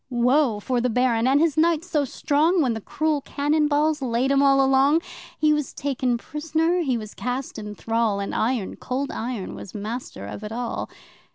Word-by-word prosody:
Woe 250 -1 +2
for 245 +3 -1
the 250 - +1
Baron 245 0 +2
and 275 +2 +4
his 320 -2 +2
knights 330 +1 +2
so 300 -5 +1
strong, 310 +6 +1
When 260 -7 +2
the 220 - -5
cruel 305 +5 -1
cannon 295 +2 +1
balls 300 0 +1
laid 255 +1 0
'em 275 0 +4
all 275 -1 +5
along! 270 +4 +4 0.4
He 305 0 +3
was 300 -2 -2
taken 260 -3 -1
prisoner, 320 +6 -1
he 265 -8 0
was 215 -2 -7
cast 250 -1 -4
in 210 -1 -7
thrall, 225 -3 0
And 200 - -4
Iron 230 -3 -1
Cold 265 +2 -3
Iron 225 -4 -4
was 195 - -10
master 210 - -5
of 150 - -7
it 210 - -6
all! 240 +1 -3
265 Hz, 190 wpm, -24 LUFS, 230-300 Hz, 0.4 s, all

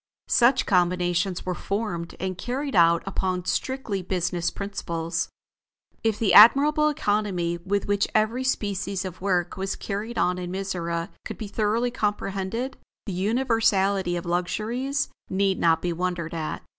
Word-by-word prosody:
Such 250 +1 +4
combinations 180 0 +1
were 185 - -1
formed 180 -3 -3
and 185 0 -2
carried 265 +6 -3
out 170 -1 +5
upon 185 -2 -2
strictly 230 -1 -2
business 180 -1 -1
principles. 170 -5 -3 0.7
If 220 -2 +1
the 200 -6 +2
admirable 295 +8 +7
economy 200 - -1
with 200 +2 0
which 205 0 +1
every 220 +4 +2
species 200 -6 -1
of 185 -1 -7
work 180 -1 0
was 190 0 -2
carried 215 +4 -5
on 180 0 +1
in 180 -1 -5
Mizora 175 -2 -3
could - - -6
be 220 - -5
thoroughly 220 +4 0
comprehended, 210 +2 -2 0.3
the 200 - -4
universality 200 -3 +1
of 175 - -4
luxuries 220 +10 -1 0.2
need 190 0 +1
not 165 -1 +3
be 175 -1 0
wondered 175 -1 -3
at. 160 -2 -4
195 Hz, 140 wpm, -25 LUFS, 180-220 Hz, 0.7 s, admirable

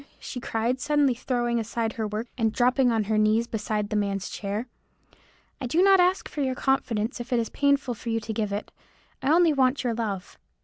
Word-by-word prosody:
she 250 - -7
cried, 235 +2 -1
suddenly 290 -2 +3
throwing 240 -1 -1
aside 225 0 -2
her 220 -2 -2
work, 210 +2 -3
and 225 -3 +1
dropping 250 0 +3
on 225 -2 +1
her 215 +1 0
knees 215 +2 +3
beside 210 -2 -3
the - - -1
man's 200 -2 -1
chair, 205 +3 -3 1.0
"I 255 - -2
do 325 +9 +3
not 390 -1 +6
ask 365 +1 +2
for 295 - -5
your 260 -2 0
confidence 245 -3 0
if 240 +2 -7
it 245 - +3
is 230 - -2
painful 280 -3 +1
to 230 +1 -7
you 225 0 +1
to 220 0 -5
give 210 -1 -2
it; 205 +2 -4 0.5
I 280 - +1
only 335 -1 +5
want 265 0 +2
your 240 -2 0
love. 210 -5 -4
235 Hz, 210 wpm, -26 LUFS, 215-265 Hz, 1.0 s, not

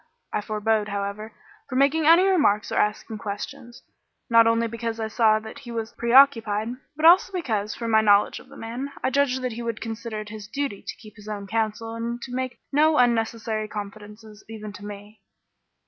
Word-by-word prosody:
I - - 0
forbore, 215 0 0
however, 200 +2 -4 0.4
from 255 - -2
making 290 +3 +3
any 335 +3 +7
remarks 290 - +2
or - - -2
asking 210 +1 -1
questions, 240 +5 -7 0.5
not 230 0 +7
only 230 0 +2
because 230 0 -4
I 220 - -2
saw 220 0 +3
that 220 +5 -9
he 265 -4 -12
was 225 -1 -4
preoccupied, 235 -4 +4 0.3
but 310 +2 -1
also 355 +3 +7
because, 220 - -2
from 230 -1 -4
my 220 0 +5
knowledge 205 -1 +3
of - - -17
the - - -13
man, 245 +5 -5
I 260 - +1
judged 260 -1 +1
that 250 - -1
he 230 +1 -6
would 230 -2 -3
consider 225 0 -5
it 210 - -9
his 210 -1 -8
duty 275 -3 -3
to - - -4
keep 215 -1 -15
his 210 0 -13
own 205 -2 -5
counsel 225 +2 -2
and 235 +1 -4
to 250 - -7
make 255 0 -3
no 305 +2 +4
unnecessary 225 -2 +1
confidences 210 +1 -9
even 215 -2 -8
to 205 - -11
me. 205 +1 -11
225 Hz, 195 wpm, -24 LUFS, 210-250 Hz, 0.5 s, any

